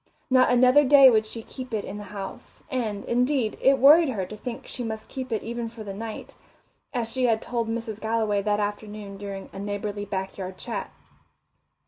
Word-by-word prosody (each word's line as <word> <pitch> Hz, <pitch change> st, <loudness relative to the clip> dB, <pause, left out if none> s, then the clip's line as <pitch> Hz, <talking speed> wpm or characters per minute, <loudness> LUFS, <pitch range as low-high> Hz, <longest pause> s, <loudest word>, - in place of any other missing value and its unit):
Not 255 Hz, 0 st, +5 dB
another 255 Hz, +4 st, +6 dB
day 275 Hz, -1 st, +8 dB
would 220 Hz, -1 st, +2 dB
she 225 Hz, +1 st, -7 dB
keep 255 Hz, -2 st, -6 dB
it 210 Hz, -, -2 dB
in 205 Hz, -, -6 dB
the 205 Hz, -, -8 dB
house, 195 Hz, -1 st, -8 dB
and, 220 Hz, -6 st, -2 dB
indeed, 250 Hz, -1 st, +1 dB
it 270 Hz, 0 st, +5 dB
worried 300 Hz, +4 st, +7 dB
her 200 Hz, -7 st, -2 dB
to 215 Hz, -, -8 dB
think 245 Hz, +4 st, -7 dB
she 250 Hz, -, -6 dB
must 220 Hz, -1 st, -5 dB
keep 260 Hz, -2 st, -6 dB
it 220 Hz, -, -1 dB
even 235 Hz, 0 st, -4 dB
for 225 Hz, -1 st, -9 dB
the 200 Hz, -2 st, -6 dB
night, 220 Hz, +2 st, -7 dB, 0.6 s
as 235 Hz, -3 st, -2 dB
she 255 Hz, 0 st, +1 dB
had 225 Hz, -2 st, +3 dB
told 235 Hz, -1 st, -2 dB
Mrs. 225 Hz, -2 st, -4 dB
Galloway 220 Hz, -2 st, +1 dB
that 205 Hz, +1 st, 0 dB
afternoon 205 Hz, -1 st, -4 dB
during 200 Hz, -1 st, -7 dB
a -, -, -7 dB
neighbourly 205 Hz, 0 st, -3 dB
back 190 Hz, -1 st, -4 dB
yard 185 Hz, 0 st, -5 dB
chat. -, -, -5 dB
220 Hz, 195 wpm, -26 LUFS, 205-250 Hz, 0.6 s, day